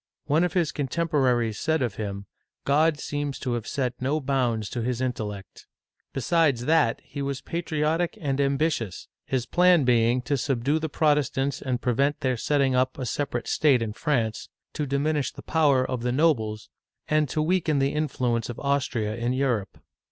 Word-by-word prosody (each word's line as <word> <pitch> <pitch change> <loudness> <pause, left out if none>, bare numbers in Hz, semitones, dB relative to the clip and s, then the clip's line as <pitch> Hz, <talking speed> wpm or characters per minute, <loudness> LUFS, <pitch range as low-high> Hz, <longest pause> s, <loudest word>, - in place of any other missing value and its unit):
One 155 +4 +2
of 180 - 0
his 170 -5 +1
contemporaries 130 -6 0
said 160 -3 +1
of 120 -5 -1
him, 100 -1 -5 0.4
God 150 +2 +3
seems 145 -2 -3
to 125 -3 -3
have 115 -2 -3
set 125 -3 -2
no 140 +4 0
bounds 125 -6 0
to 120 - -3
his 125 +1 -1
intellect." 110 -6 -5 0.4
Besides 135 -2 +1
that, 155 -7 +3
he 140 - -7
was 140 -1 -3
patriotic 165 +1 -1
and 140 -2 -1
ambitious, 140 - -1 0.2
his 130 -3 -1
plan 180 +1 +4
being 120 0 +3
to 140 +2 0
subdue 135 +3 0
the 160 0 -3
Protestants 145 -2 +1
and 125 -2 -2
prevent 140 +4 +1
their 130 -1 +1
setting 135 +2 +1
up 130 0 +1
a 130 - -3
separate 120 -2 -2
state 135 -6 +3
in 110 -2 -4
France; 115 -4 -1 0.2
to 150 -2 -2
diminish 140 0 0
the - - -12
power 145 -5 +3
of 125 -2 -3
the 125 +1 0
nobles; 115 -8 +1 0.4
and 155 -2 +2
to 155 - -2
weaken 155 -1 +1
the 135 0 +1
influence 125 -6 -1
of 120 - -6
Austria 130 -6 -1
in 120 +2 -1
Europe. 125 -7 -1
135 Hz, 170 wpm, -26 LUFS, 120-150 Hz, 0.4 s, plan